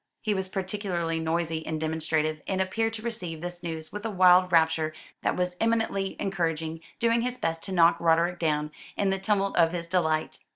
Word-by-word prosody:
He 215 - +1
was 190 -1 -2
particularly 185 -4 -2
noisy 160 0 -1
and 160 -1 -3
demonstrative, 155 -1 -1
and 190 -1 -1
appeared 225 +4 0
to 220 -1 -6
receive 185 -9 -4
this 175 0 -5
news 160 -2 -5
with 210 0 -6
a 225 - -2
wild 185 -2 +5
rapture 160 -2 +3 0.3
that - - 0
was 180 0 -1
eminently 225 -4 0
encouraging, 165 -4 -2 0.2
doing 230 0 +2
his 250 +1 -2
best 165 -5 -2
to 195 - -6
knock 170 -2 +5
Roderick 170 +1 +2
down, 150 -2 0 0.3
in 200 -1 +2
the 195 - -1
tumult 195 0 0
of 165 -1 +4
his 170 -1 -4
delight. 160 -3 0
175 Hz, 190 wpm, -27 LUFS, 160-195 Hz, 0.3 s, wild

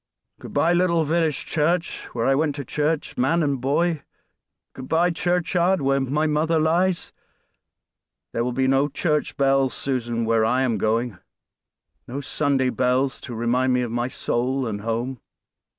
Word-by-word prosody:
"Good - - -10
by, 170 +2 +3
little 175 -2 +2
village 160 -1 0
church, 170 +2 0
where 115 - 0
I 135 - +4
went 145 +1 +1
to 140 -2 -6
church 150 +2 -2
man 160 +7 +2
and 140 -4 -1
boy; 155 +4 +1 0.7
good 130 0 -9
by, 170 +4 +2
churchyard, 175 +1 +1
where 135 0 +1
my 140 +4 0
mother 155 +2 +1
lies; 170 +3 +1 1.2
there 115 - 0
will 125 - -1
be 130 +2 0
no 135 +2 +3
church 150 +1 -1
bells, 135 -1 +2
Susan, 120 -4 -2
where 115 0 +2
I 125 +4 +2
am 120 -4 0
going; 115 -2 0 0.9
no 135 +3 -5
Sunday 140 -2 0
bells 130 +1 0
to 120 - -7
remind 125 +3 +1
me 125 0 +1
of 120 - -4
my 120 +1 -1
soul 130 +1 -1
and 105 -3 -4
home." 115 +4 -3
135 Hz, 160 wpm, -23 LUFS, 125-160 Hz, 1.2 s, I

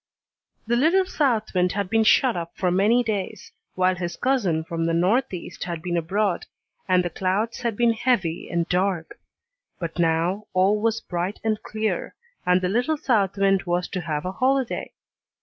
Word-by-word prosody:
The 235 +2 +1
little 335 +9 +3
south 250 -11 0
wind 180 -1 +2
had 200 -1 -1
been 225 +3 +2
shut 240 +2 +4
up 170 -1 -5
for 180 -2 +1
many 210 +7 +3
days, 210 -4 -4 0.2
while 185 0 +3
his 175 -1 -5
cousin 200 -12 +1
from 165 0 -3
the 165 0 +1
northeast 185 +1 0
had 170 -2 -5
been 175 -1 -2
abroad, 185 +3 0 0.4
and 180 -1 +3
the 175 - -2
clouds 200 +5 -1
had 230 -3 -2
been 235 -1 +3
heavy 215 -8 0
and 170 -1 -1
dark; 180 -2 -1 0.6
but 170 -1 -5
now 170 +5 +1
all 195 +3 +3
was 225 0 +1
bright 180 +3 -3
and 215 -1 0
clear, 220 0 -3 0.3
and 180 +1 +4
the 180 - 0
little 245 +11 +1
south 210 - +1
wind 195 -1 +3
was 175 +1 0
to 185 - -3
have 155 -2 -3
a 185 - -2
holiday. 260 +4 0
190 Hz, 175 wpm, -24 LUFS, 175-225 Hz, 0.6 s, shut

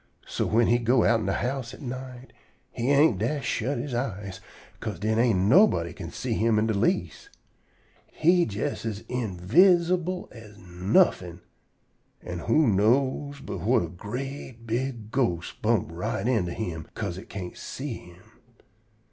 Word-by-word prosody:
So - - -2
whin 115 +2 +3
he 120 +2 +3
go 120 +1 +3
outen 115 -3 +2
de 95 - +1
house 125 +1 -3
at - - -15
night, 130 0 -7 0.4
he 120 +3 -2
ain't 140 - +4
dast 130 +5 -1
shut 130 +5 -1
he 135 -5 -4
eyes, 100 -6 -4 0.4
'ca'se 105 -5 -4
den 110 +2 0
ain't 115 -4 +3
nobody 100 - +4
can 85 -2 -7
see 125 +7 -3
him 110 0 +2
in 105 - +2
de 110 - 0
least. 100 - -1 0.8
He 175 +2 +3
jest 105 +1 -3
as 110 -2 -4
invidsible 170 - +2
as 105 -3 -13
nuffin'! 90 - +1 0.8
An' 90 0 -5
who 155 - +3
know 130 +7 +2
but - - -5
whut 105 +4 +2
a 85 - -5
great, 120 - -7
big 115 -1 -3
ghost 90 -11 -1
bump 110 -5 +1
right 90 +5 -3
into 95 -9 +1
him 85 -8 -4
'ca'se 90 +2 -4
it - - -13
can't 90 -3 -6
see 135 -1 -6
him? 90 +2 -16
115 Hz, 155 wpm, -26 LUFS, 95-130 Hz, 0.8 s, ain't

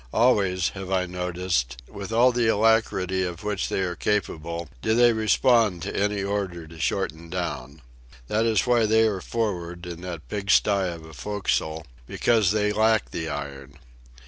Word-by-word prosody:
Always, 100 -7 +3
have 95 -2 -8
I 95 -1 +1
noticed, 90 -8 -2
with 100 +1 -8
all 120 +3 +5
the 120 -1 +1
alacrity 105 -4 +2
of 90 0 -5
which 105 -2 -2
they - - -1
are 90 -2 -2
capable, 85 -5 -2
do 110 - +1
they 120 0 +5
respond 110 -3 +3
to - - -4
any 105 0 0
order 100 -4 -3
to 80 +1 -13
shorten 80 +1 -2
down. 75 -5 -5 0.4
That 110 - +1
is 110 -4 +2
why 120 -3 +3
they 110 +1 +4
are 100 -4 -2
for'ard, 90 -7 -3
in 85 -1 -7
that 85 -4 -7
pigsty 100 -1 +2
of 85 -2 -8
a 80 - -12
forecastle, 80 -1 -2 0.2
because 110 -6 +2
they 105 0 +1
lack 110 +1 +2
the 80 -1 -4
iron. 70 -2 -7
95 Hz, 165 wpm, -25 LUFS, 85-110 Hz, 0.4 s, all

